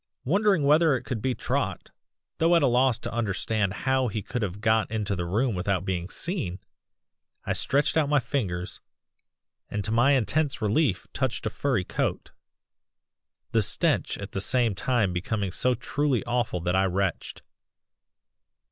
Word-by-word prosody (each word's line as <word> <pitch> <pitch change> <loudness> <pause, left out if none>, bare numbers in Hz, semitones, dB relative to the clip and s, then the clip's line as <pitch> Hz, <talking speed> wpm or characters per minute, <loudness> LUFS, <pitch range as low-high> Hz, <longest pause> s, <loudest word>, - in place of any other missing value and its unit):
Wondering 195 +2 +3
whether 150 +1 +4
it 125 - -4
could 115 -2 -4
be 130 +1 0
Trot, - - -2 0.5
though 165 +2 +4
at 165 - +4
a - - +5
loss 125 -1 +3
to 120 - -6
understand 110 -2 -1
how 130 -1 +2
he 105 -2 -3
could 125 +2 -4
have 100 -2 -3
got 110 +1 +2
into 105 -2 -2
the 90 -1 -3
room 115 +7 +1
without 95 +1 -1
being 90 -1 -2
seen, 165 - -3 0.9
I - - 0
stretched 140 +2 +1
out 155 -3 +2
my 145 -1 +4
fingers 110 -10 -3 0.9
and 105 -1 -3
to 110 - -1
my 120 +5 +4
intense 140 +3 +1
relief 105 - +1
touched 130 -3 -2
a - - -1
furry 130 -9 0
coat - - -3 1.2
the - - +3
stench - - +1
at 100 0 -7
the 95 - -3
same 120 0 +3
time 105 -2 0
becoming 95 +2 -2
so 125 +7 +2
truly 140 +1 -1
awful 120 -7 -1
that 90 +2 0
I 95 +1 +3
retched. 95 0 -2
115 Hz, 160 wpm, -26 LUFS, 100-135 Hz, 1.2 s, a